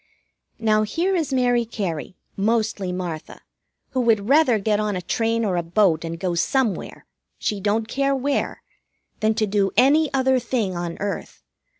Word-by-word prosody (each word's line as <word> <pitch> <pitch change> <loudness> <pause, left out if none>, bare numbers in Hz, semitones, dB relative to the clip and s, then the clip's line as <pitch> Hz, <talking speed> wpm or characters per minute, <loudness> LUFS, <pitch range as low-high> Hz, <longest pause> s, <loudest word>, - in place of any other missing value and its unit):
Now, 215 -2 +2
here 340 - 0
is 320 -5 -1
Mary 245 -2 +2
Cary, 190 -7 -4 0.2
mostly 210 -2 0
Martha, 175 -3 -6 0.5
who 260 - 0
would 220 -4 +2
rather 275 -4 +5
get 210 0 0
on 210 -2 -1
a 180 - -3
train 230 +3 0
or 185 -4 0
a - - +1
boat 170 -1 +2
and 165 0 -5
go 180 -1 -1
somewhere 230 +5 -1 0.3
she 210 - -2
don't 215 +3 0
care 275 +3 0
where 275 +1 -2 0.6
than 220 0 +2
to 215 - +1
do 200 -1 +1
any 285 +4 +4
other 265 -1 +2
thing 230 -6 -2
on 175 -1 -4
earth. 200 0 -5
215 Hz, 165 wpm, -23 LUFS, 195-255 Hz, 0.6 s, rather